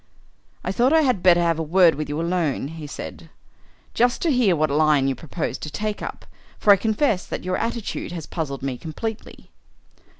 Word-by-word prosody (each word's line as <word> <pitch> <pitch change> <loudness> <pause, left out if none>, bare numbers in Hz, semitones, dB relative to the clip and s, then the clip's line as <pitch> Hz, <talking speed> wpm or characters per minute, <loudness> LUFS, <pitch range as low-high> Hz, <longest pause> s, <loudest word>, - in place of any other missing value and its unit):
"I - - -2
thought 245 +8 +2
I 320 - +6
had 255 - +1
better 175 -1 +5
have 165 -1 +1
a - - 0
word 170 +2 +5
with 150 +1 -5
you 145 +2 -2
alone," 165 -5 -1
he 160 -2 -8
said, - - -8 0.6
"just 245 +1 +2
to 335 - +2
hear 240 -9 +3
what 155 -2 +1
line 150 -2 +3
you 135 - +1
propose 160 +5 -4
to 155 - -6
take 210 +7 -3
up, - - -7 0.3
for 205 - +6
I - - +6
confess 215 0 +1
that - - -5
your 185 +1 -1
attitude 230 -6 -3
has 165 -4 -6
puzzled 140 -5 -4
me 130 -3 -3
completely." 215 +7 -7
175 Hz, 195 wpm, -23 LUFS, 155-215 Hz, 0.6 s, I